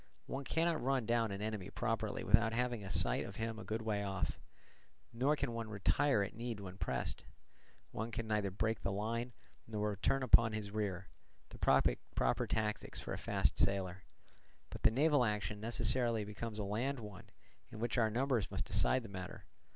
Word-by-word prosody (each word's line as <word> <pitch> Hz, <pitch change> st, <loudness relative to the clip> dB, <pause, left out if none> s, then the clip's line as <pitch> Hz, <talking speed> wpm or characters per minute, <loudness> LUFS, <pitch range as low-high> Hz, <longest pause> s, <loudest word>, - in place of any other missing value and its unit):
One 135 Hz, +1 st, -4 dB
cannot 165 Hz, +4 st, +1 dB
run 130 Hz, -2 st, +1 dB
down 115 Hz, 0 st, +2 dB
an 100 Hz, +1 st, -4 dB
enemy 105 Hz, -3 st, -3 dB
properly 115 Hz, -3 st, -2 dB
without 115 Hz, 0 st, +4 dB
having 120 Hz, -2 st, 0 dB
a 95 Hz, -, -6 dB
sight -, -, +1 dB
of -, -, -8 dB
him 115 Hz, 0 st, -3 dB
a -, -, -6 dB
good 110 Hz, +1 st, -3 dB
way 105 Hz, -2 st, 0 dB
off, 95 Hz, -1 st, -2 dB, 0.7 s
nor 135 Hz, +6 st, +2 dB
can 140 Hz, -4 st, -2 dB
one 115 Hz, -1 st, -4 dB
retire 110 Hz, +3 st, +2 dB
at 100 Hz, -, -5 dB
need 115 Hz, -1 st, -4 dB
when 95 Hz, -1 st, -8 dB
pressed; -, -, -2 dB, 0.7 s
one 110 Hz, +2 st, -3 dB
can 115 Hz, 0 st, -3 dB
neither 105 Hz, -2 st, 0 dB
break 110 Hz, +3 st, -1 dB
the 95 Hz, -, -1 dB
line 115 Hz, +5 st, -2 dB, 0.4 s
nor 105 Hz, -1 st, -1 dB
return 130 Hz, +7 st, +1 dB
upon 115 Hz, -3 st, +6 dB
his 105 Hz, -2 st, -4 dB
rear, 100 Hz, -3 st, -2 dB, 0.4 s
the -, -, -12 dB
proper -, -, +2 dB
tactics 105 Hz, -1 st, -1 dB
for -, -, -4 dB
a -, -, -3 dB
fast -, -, +1 dB
sailer; 95 Hz, -2 st, +1 dB, 0.7 s
but -, -, -7 dB
the -, -, +6 dB
naval 145 Hz, +3 st, +4 dB
action 105 Hz, -1 st, -1 dB
necessarily 115 Hz, 0 st, +2 dB
becomes 105 Hz, +1 st, -5 dB
a 105 Hz, -, -1 dB
land 120 Hz, +7 st, -1 dB
one, 105 Hz, -4 st, -9 dB, 0.4 s
in -, -, -9 dB
which 115 Hz, +2 st, -1 dB
numbers 120 Hz, 0 st, +1 dB
must -, -, -2 dB
decide 130 Hz, -1 st, +2 dB
the -, -, -7 dB
matter. 95 Hz, -3 st, -7 dB
110 Hz, 180 wpm, -36 LUFS, 100-120 Hz, 0.7 s, upon